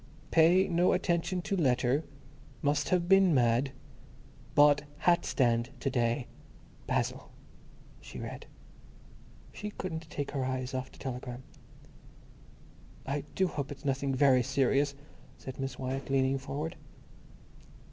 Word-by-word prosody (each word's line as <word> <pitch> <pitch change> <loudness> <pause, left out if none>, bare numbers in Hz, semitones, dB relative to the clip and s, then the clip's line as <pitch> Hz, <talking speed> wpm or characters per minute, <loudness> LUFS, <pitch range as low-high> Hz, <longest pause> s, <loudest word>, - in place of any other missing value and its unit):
"Pay 175 +4 +5
no 175 0 +3
attention 180 0 0
to 200 - -1
letter, 135 -2 +2 0.6
must 145 0 +1
have 175 -1 +2
been 195 -3 +5
mad, 120 +2 +2 0.8
bought 145 0 +6 0.2
hat 170 +3 +3
stand 120 -2 +1
to 135 - -1
day—Basil," 120 +1 -3 0.7
she - - -11
read. - - -7 1.1
She 210 - -5
couldn't 165 -5 -6
take 145 -1 -4
her 135 -2 -2
eyes 130 0 -3
off 130 0 -4
the - - -17
telegram. 125 -1 -6 1.6
"I 140 +1 -2
do 190 - +2
hope 145 -5 -4
it's 145 +1 -9
nothing 135 0 0
very 130 -1 +5
serious," 135 +2 +1 0.4
said 130 0 -9
Miss 135 0 -4
Wyatt, 135 +1 -4
leaning 135 0 +2
forward. 150 +5 -5
140 Hz, 120 wpm, -30 LUFS, 130-165 Hz, 1.6 s, bought